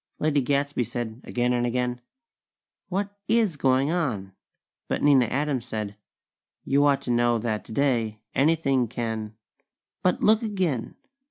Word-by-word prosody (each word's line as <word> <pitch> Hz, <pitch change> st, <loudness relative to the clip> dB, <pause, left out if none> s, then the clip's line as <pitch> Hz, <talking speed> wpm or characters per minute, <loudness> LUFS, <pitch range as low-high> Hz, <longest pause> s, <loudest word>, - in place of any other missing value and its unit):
Lady 150 Hz, -2 st, +2 dB
Gadsby 140 Hz, 0 st, 0 dB
said 120 Hz, 0 st, -5 dB
again 125 Hz, 0 st, 0 dB
and 120 Hz, 0 st, +1 dB
again: 125 Hz, 0 st, -1 dB, 0.9 s
"What 200 Hz, +2 st, -2 dB
is 220 Hz, -6 st, +2 dB
going 135 Hz, +1 st, +2 dB
on?" 115 Hz, -, -2 dB, 0.5 s
but -, -, -2 dB
Nina 140 Hz, -4 st, +6 dB
Adams 135 Hz, 0 st, -1 dB
said: 105 Hz, -3 st, -4 dB, 0.7 s
"You 140 Hz, +1 st, +3 dB
ought 140 Hz, -1 st, +2 dB
to 125 Hz, -, -2 dB
know 120 Hz, 0 st, +3 dB
that 110 Hz, -1 st, -2 dB
today, 115 Hz, -3 st, 0 dB, 0.2 s
anything 135 Hz, -4 st, +2 dB
can 110 Hz, -2 st, -4 dB, 0.3 s
" -, -, -66 dB
But 180 Hz, -1 st, +2 dB
_look 215 Hz, +2 st, +4 dB
again!! 185 Hz, -, -2 dB
130 Hz, 140 wpm, -26 LUFS, 120-150 Hz, 0.9 s, Nina